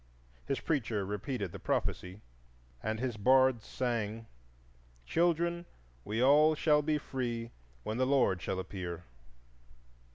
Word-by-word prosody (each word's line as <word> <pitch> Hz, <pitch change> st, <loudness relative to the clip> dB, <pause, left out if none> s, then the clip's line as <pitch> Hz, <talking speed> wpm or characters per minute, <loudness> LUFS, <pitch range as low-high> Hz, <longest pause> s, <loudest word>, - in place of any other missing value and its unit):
His 135 Hz, 0 st, -1 dB
preacher 115 Hz, -9 st, -1 dB
repeated 105 Hz, 0 st, -3 dB
the -, -, -8 dB
prophecy, 90 Hz, +3 st, -2 dB, 0.6 s
and 110 Hz, +1 st, -2 dB
his 125 Hz, -3 st, -2 dB
bards 130 Hz, +1 st, +4 dB
sang,— 115 Hz, -3 st, -2 dB, 0.8 s
"Children, 170 Hz, -, +1 dB, 0.4 s
we 110 Hz, -, -1 dB
all 150 Hz, +3 st, +6 dB
shall 150 Hz, -1 st, +3 dB
be 150 Hz, +1 st, +1 dB
free 120 Hz, -5 st, -4 dB, 0.3 s
When 110 Hz, -, -3 dB
the 130 Hz, 0 st, +2 dB
Lord 130 Hz, -10 st, +3 dB
shall 95 Hz, -, -2 dB
appear!" 90 Hz, -3 st, -5 dB
120 Hz, 120 wpm, -32 LUFS, 105-140 Hz, 0.8 s, all